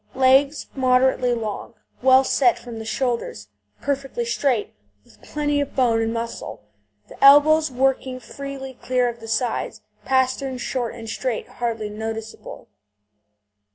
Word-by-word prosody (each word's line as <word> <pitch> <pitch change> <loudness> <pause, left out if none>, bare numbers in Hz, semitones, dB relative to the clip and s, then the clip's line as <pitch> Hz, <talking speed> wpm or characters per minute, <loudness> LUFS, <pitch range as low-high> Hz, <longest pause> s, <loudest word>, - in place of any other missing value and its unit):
Legs 270 +3 +4
moderately 255 -1 +2
long, 220 -3 -5 0.3
well 260 +1 +6
set 255 -2 +3
from 235 -2 -9
the 220 - -7
shoulders, 235 - -2 0.3
perfectly 270 -4 -2
straight, 235 -1 0 0.3
with - - -23
plenty 290 -1 -1
of 285 - -5
bone 235 -4 +3
and 225 0 0
muscle; 230 - -5 0.4
the - - -8
elbows 300 +3 +7
working 260 0 0
freely 275 0 -8
clear 250 -1 +1
of 235 -1 -5
the 225 - -10
sides; 225 -1 -2 0.2
pasterns 260 0 0
short 240 -3 -3
and 230 -1 -9
straight, 230 +1 -3
hardly 230 -3 -3
noticeable. 220 +1 -7
255 Hz, 130 wpm, -22 LUFS, 230-270 Hz, 0.4 s, elbows